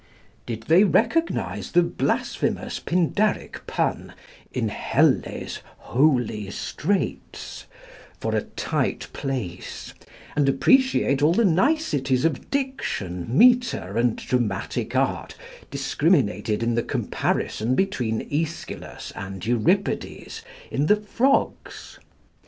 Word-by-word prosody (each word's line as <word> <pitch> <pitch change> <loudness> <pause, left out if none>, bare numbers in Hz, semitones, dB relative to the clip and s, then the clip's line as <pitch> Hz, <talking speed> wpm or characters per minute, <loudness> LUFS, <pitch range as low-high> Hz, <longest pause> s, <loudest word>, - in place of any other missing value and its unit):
Did 115 -2 -4
they 165 - +5
recognize 230 - +1
the 175 0 +6
blasphemous - - -1
Pindaric 180 +5 0
pun - - -2 0.4
in - - -1
"Helle's - - 0 0.2
holy 125 -7 +1
straits," 195 - -3 0.5
for - - -1
a - - +2
tight - - -2
place, 125 -11 -5 0.4
and 145 -2 +3
appreciate 140 - +3
all 155 +3 +5
the 230 +4 +3
niceties 165 - +2
of 155 -6 -1
diction, 185 - -3
metre, 240 - +4
and 120 0 +2
dramatic 115 -7 -2
art - - 0 0.3
discriminated 105 +1 +1
in 120 0 +1
the 120 - +1
comparison 115 +1 -1
between 125 - -1
Aeschylus 160 +2 -4
and 95 0 -6
Euripides 120 - 0 0.3
in 145 - 0
the 210 - +6
'Frogs'? 230 +6 -1
145 Hz, 100 wpm, -24 LUFS, -, 0.5 s, the